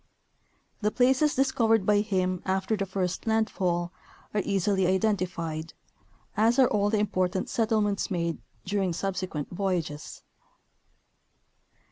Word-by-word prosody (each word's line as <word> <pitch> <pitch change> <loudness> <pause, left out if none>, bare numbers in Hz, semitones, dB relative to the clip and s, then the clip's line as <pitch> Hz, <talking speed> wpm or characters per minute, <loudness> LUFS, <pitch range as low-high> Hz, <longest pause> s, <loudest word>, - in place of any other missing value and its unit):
The 210 - +2
places 260 +6 +3
discovered 230 -6 +2
by 210 0 +4
him 185 -3 0
after 190 +3 0
the 195 -1 -2
first 185 +1 -2
landfall 185 -6 0 0.4
are 210 - +1
easily 195 -1 +1
identified, 180 -5 -1 0.6
as 225 +3 +3
are 260 -2 +6
all 205 -2 +1
the 215 - +1
important 185 -3 0
settlements 215 -3 +1
made 170 -6 -1 0.3
during 195 -2 0
subsequent 185 -5 -3
voyages. 175 -5 -3
195 Hz, 110 wpm, -27 LUFS, 180-215 Hz, 0.6 s, are